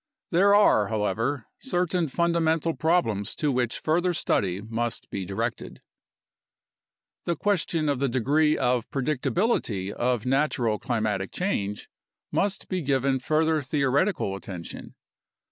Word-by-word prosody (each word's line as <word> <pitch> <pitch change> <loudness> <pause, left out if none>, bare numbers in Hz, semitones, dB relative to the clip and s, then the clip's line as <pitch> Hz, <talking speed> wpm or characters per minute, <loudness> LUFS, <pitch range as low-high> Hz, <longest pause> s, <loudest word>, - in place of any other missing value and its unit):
There 200 +4 +5
are, 110 - +5
however, 115 +5 -1
certain 180 -8 0
fundamental 165 +1 +1
problems 155 - 0
to 150 -2 0
which 125 -2 0
further 175 +3 +1
study 95 - 0
must 115 +2 -3
be 95 -2 -3
directed: 115 +5 -4 1.5
The 170 - 0
question 170 -4 0
of 140 -3 0
the 140 -1 +1
degree 145 +5 +2
of 125 -2 0
predictability 135 - 0
of 120 0 -1
(natural) 125 -5 +1
climatic 110 -6 -1
change 105 - -2 0.4
must 200 0 -1
be 185 -2 -2
given 135 -2 +1
further 155 +3 +1
theoretical 140 - 0
attention. 90 -3 -8
135 Hz, 115 wpm, -26 LUFS, 110-165 Hz, 1.5 s, There